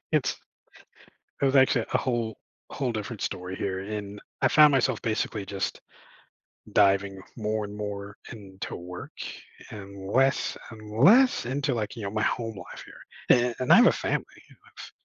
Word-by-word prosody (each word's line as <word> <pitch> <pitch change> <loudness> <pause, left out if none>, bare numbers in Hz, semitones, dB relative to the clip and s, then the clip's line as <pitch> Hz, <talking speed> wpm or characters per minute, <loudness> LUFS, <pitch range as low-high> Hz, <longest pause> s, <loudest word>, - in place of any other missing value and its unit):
it's - - +1 1.0
it - - +2
was 135 +1 +3
actually 130 -3 +4
a - - +3
whole 120 -4 -2 0.3
whole 130 -4 -2
different 110 0 -5
story 90 +1 -4
here, 95 -1 -2
and 105 0 -6 0.2
I - - +5
found 150 -1 +7
myself 130 -3 +1
basically 110 -2 -2
just 100 -1 -3 0.9
diving 100 -1 +3 0.2
more 110 -1 -1
and 105 0 -8
more 100 -1 -5 0.2
into 100 -4 -8
work 90 0 -8 0.6
and 100 -2 -9
less 135 +1 +2
and 110 0 -9
less 250 - +6
into, 140 +2 -1
like, 110 -2 -3
you 115 - -7
know, 100 - -3
my 110 0 -1
home 115 0 -1
life 90 -2 -10
here, 120 -1 0
a - - -10
and 130 - +4
I - - +9
have 245 - +7
a - - +6
family. - - -2
I - - -20
have - - -12
110 Hz, 165 wpm, -27 LUFS, 100-125 Hz, 1.0 s, I